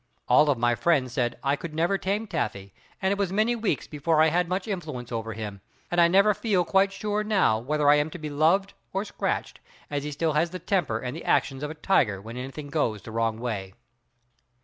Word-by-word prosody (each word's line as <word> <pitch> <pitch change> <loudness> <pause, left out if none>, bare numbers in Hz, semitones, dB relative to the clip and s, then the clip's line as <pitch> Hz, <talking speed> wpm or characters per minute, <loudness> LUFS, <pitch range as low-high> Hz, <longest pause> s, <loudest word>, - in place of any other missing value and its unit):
All 150 0 +5
of 140 - +2
my 120 +1 +2
friends 130 -2 +1
said 120 -2 -1
I 140 +1 +2 0.2
never 170 +5 +1
could - - -26
tame 205 +3 -1
Taffy 100 - -3 0.3
and 190 - +2
it 200 - -1
was 195 -3 0
many 215 +4 +2
weeks 220 - -1
before 155 +2 0
I 160 +1 +6
had 175 +2 +1
much 185 +2 -2
influence 150 - -5
over 115 -1 -3
him, 105 -2 -6 0.3
and 175 0 +3
I 170 - +7
never 200 +4 +5
feel 195 -5 +1
quite 195 +2 +3
sure 210 +2 -2
now 195 - +2
whether 145 +5 0
I 145 +1 +7
am 150 +1 +1
to 165 - -8
be 155 -2 -6
loved 170 +7 +2 0.2
or 195 +2 -1
scratched, - - -3 0.3
as 145 -1 -2
he 150 - -4
still 155 +2 0
has 160 +3 +2
the 185 - -6
temper 175 - 0
and 125 +4 -5
the 165 - -7
actions 135 -2 +1
of 150 - -3
a 155 - -7
tiger 125 - +2
when 110 +4 -9
anything 135 +3 -6
goes 115 -10 -1
the 110 - -9
wrong 115 0 0
way. 100 -6 -4
150 Hz, 225 wpm, -26 LUFS, 125-190 Hz, 0.3 s, I